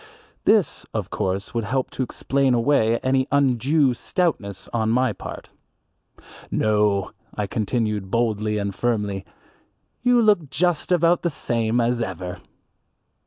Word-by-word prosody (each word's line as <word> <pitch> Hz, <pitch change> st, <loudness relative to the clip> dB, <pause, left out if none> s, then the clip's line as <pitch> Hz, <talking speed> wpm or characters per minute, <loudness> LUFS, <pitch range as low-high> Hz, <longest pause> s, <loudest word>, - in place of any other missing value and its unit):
This 215 Hz, -4 st, +3 dB
of -, -, -3 dB
course 95 Hz, +2 st, -2 dB
would 115 Hz, -1 st, -1 dB
help 130 Hz, +4 st, -1 dB
to -, -, -4 dB
explain 135 Hz, +1 st, +1 dB
away 115 Hz, -2 st, +3 dB
any 130 Hz, 0 st, +2 dB
undue 140 Hz, +1 st, +3 dB
stoutness 120 Hz, -, -2 dB
on 110 Hz, -2 st, 0 dB
my 125 Hz, 0 st, +2 dB
part. -, -, -9 dB, 1.0 s
"No," 105 Hz, -3 st, +1 dB, 0.2 s
I 105 Hz, -, -1 dB
continued 105 Hz, -1 st, -1 dB
boldly 110 Hz, -2 st, 0 dB
and 100 Hz, -1 st, -2 dB
firmly, 105 Hz, -4 st, -1 dB, 0.8 s
"you 245 Hz, -1 st, +4 dB
look 205 Hz, -, +3 dB
just 175 Hz, +4 st, 0 dB
about 170 Hz, 0 st, +3 dB
the 170 Hz, -, 0 dB
same 115 Hz, -5 st, 0 dB
as 120 Hz, 0 st, +1 dB
ever." 90 Hz, -3 st, -4 dB
120 Hz, 125 wpm, -23 LUFS, 105-140 Hz, 1.0 s, you